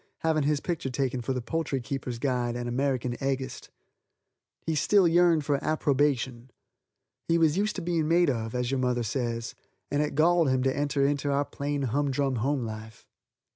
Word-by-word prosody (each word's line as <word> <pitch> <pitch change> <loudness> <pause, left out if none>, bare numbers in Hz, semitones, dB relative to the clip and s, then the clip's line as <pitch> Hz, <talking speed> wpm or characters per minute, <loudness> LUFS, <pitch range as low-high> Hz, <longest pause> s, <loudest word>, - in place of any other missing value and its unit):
having 160 -1 +2
his 145 0 +1
picture 165 -4 -3
taken 130 -1 -1
for 120 - -3
the 125 -2 -2
Poultry 150 0 -2
Keepers' 130 -1 -4
Guide 120 -2 -1
and 120 0 -3
American 125 -1 -1
Eggist. 135 -1 -3 1.0
He 160 - 0
still 185 +5 +4
yearned 170 -2 +4
for 140 -1 0
approbation. 135 -5 0 0.8
He 165 - +3
was 160 -2 +3
used 210 +3 0
to 185 - -4
being 165 -2 0
made 175 +2 +4
of, 115 -1 -4
as 125 0 -1
your 135 - 0
mother 125 -1 0
says, 115 0 -3 0.4
and 145 +1 +1
it 150 - -2
galled 165 0 +4
him 130 -1 +1
to 130 0 +1
enter 145 -1 +1
into 145 0 0
our 140 +1 +1
plain, 145 0 -3
humdrum 135 +1 0
home 130 +2 0
life. 110 0 -8
140 Hz, 175 wpm, -27 LUFS, 125-150 Hz, 1.0 s, still